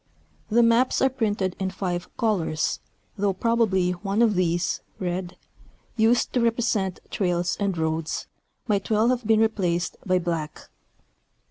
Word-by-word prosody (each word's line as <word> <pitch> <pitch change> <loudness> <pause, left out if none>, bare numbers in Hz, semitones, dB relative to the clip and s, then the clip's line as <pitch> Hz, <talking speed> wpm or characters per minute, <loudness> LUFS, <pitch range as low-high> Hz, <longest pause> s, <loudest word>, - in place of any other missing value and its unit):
The 235 +2 +4
maps 230 +2 +3
are 265 - +4
printed 205 -7 -1
in 190 -1 -1
five 180 -2 -3
colors, 180 -8 0 0.4
though 200 -1 +1
probably 200 -4 +1
one 195 +5 0
of 225 -3 +3
these, 175 -1 0 0.2
red 180 -1 -4 0.6
(used 230 +2 +2
to 245 - +2
represent 225 -5 0
trails 175 -2 0
and 200 -3 -1
roads) 160 0 -2 0.4
might 200 -3 0
well 220 +2 +3
have 250 -3 -1
been 220 -1 +4
replaced 180 -6 0
by 185 -1 +2
black. 165 -4 -4
195 Hz, 135 wpm, -25 LUFS, 175-225 Hz, 0.6 s, The